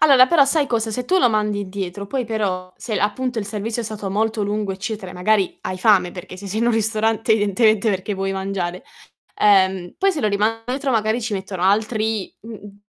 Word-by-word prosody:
Allora 270 -4 +7
però 295 -1 +5
sai 285 +1 +1
cosa? 225 -3 -1
Se 250 +3 -3
tu 375 +7 +2
lo 245 - +5
mandi 210 -1 0
indietro, 195 0 -5
poi 255 +2 -2
però 190 -5 -2
se 215 -4 -3
appunto 245 +4 -1
il 205 - -3
servizio 220 +3 -3
è - - -7
stato 210 -2 -5
molto 220 +1 0
lungo, 205 -1 -2
eccetera, 195 -1 -5
e - - -10
magari 195 +1 +1
hai 185 - -4
fame 185 -4 +4
perché 185 0 -9
se 200 +2 -9
sei 215 +4 -2
in 235 - +2
un 240 - +3
ristorante 220 0 +1
evidentemente 215 +1 +2
perché 195 +2 -2
vuoi 195 0 -2
mangiare, 190 -2 -3 0.5
ehm, 190 -3 +3
poi 390 0 +3
se 310 - -3
lo 215 - +1
riman 215 +3 0
indietro 270 +2 -2
magari 220 +1 +1
ci 220 -1 -4
mettono 190 -2 -4
altri 215 +1 0
mhmm, 230 +2 -10
mhmm, 205 -1 -13
210 Hz, 215 wpm, -21 LUFS, 195-225 Hz, 0.5 s, Allora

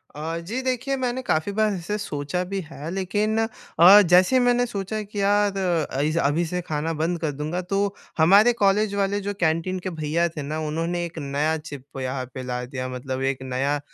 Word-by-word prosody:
अ, 160 +3 -4
जी। 215 +10 -4
देखिए 260 +1 -1
मैंने 255 0 -2
काफ़ी 160 -5 0
बार 215 +1 +2
ऐसे 190 +3 -3
सोचा 180 -2 -3
भी 195 - -1
है। 155 0 -7
लेकिन 205 +4 -1 0.4
अ, 190 +5 +10
जैसे 180 +5 +4
ही - - +6
मैंने 245 0 +3
सोचा 215 -2 -4
कि 205 0 -5
यार 205 0 +2 0.3
अई 145 +3 0
ज 165 - -2
अभी 165 +4 0
से 180 +2 -3
खाना 155 +2 -1
बंद 170 +1 0
कर 155 -2 -1
दूँगा 150 +5 -3
तो 195 +2 -1 0.2
हमारे 200 +9 +6
कॉलेज 200 +1 +3
वाले 200 0 0
जो 205 +1 -3
कैंटीन 165 +3 0
के 185 - -4
भईया 160 0 0
थे 155 -2 -7
ना 150 +2 -4
उन्होंने 165 +3 -2
1 170 -1 -9
नया 145 +2 0
चिप 145 -3 -9 0.2
यहाँ 130 0 -3
पे 130 - -6
ला 125 0 -3
दिया। 130 0 -5
मतलब 130 +1 -4
एक 135 0 0
नया 135 +3 -1
175 Hz, 200 wpm, -24 LUFS, 150-200 Hz, 0.4 s, अ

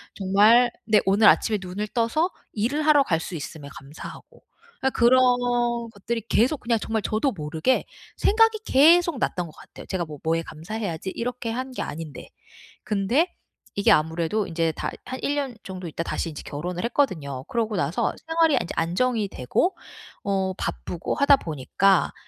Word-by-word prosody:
정말 210 +5 +5
네 215 -1 +4
오늘 205 +3 +5
아침에 215 -3 +4
눈을 190 +3 -4
떠서 250 +9 +1 0.2
일을 255 +8 -1
하러 300 -2 +6
갈 165 -8 0
수 170 - -6
있음에 145 -1 -7
감사하고. 140 +3 -11 0.4
아 265 - +2
그런 250 +2 +5 0.7
것들이 230 +3 -4
계속 260 +6 +2
그냥 230 -2 +1
정말 220 0 -2
저도 220 +7 0
모르게 160 +8 0 0.3
생각이 445 +1 +4
계속 325 +1 +5
났던 180 -7 -1
것 - - -12
같아요. - - -13
제가 180 -3 -2
뭐 150 -2 -10
'뭐에 165 +1 +1
감사해야지.' 175 +2 -5
이렇게 240 -1 -3
한 255 +2 -4
게 - - -4
아닌데. 155 -3 -7 0.5
근데 230 - +1 0.4
이게 200 - +3
아무래도 165 +6 +1
인제 165 -1 0
다 - - -4
한 260 - -6
1 290 - 0
년 270 -5 -2
정도 185 -2 -7
있다가 165 +1 -5
다시 165 - -2
인제 150 - -8
결혼을 175 +5 -4
했거든요. 155 - -1
그러고 225 -2 -2
나서 160 0 0
생활이 325 -1 +3
인제 - - -6
안정이 210 +6 0
되고 135 - 0 0.5
어 190 -1 0
바쁘고 175 - -4
하다 280 -1 +5
보니까 170 - +1
205 Hz, 335 characters per minute, -24 LUFS, 165-255 Hz, 0.7 s, 하러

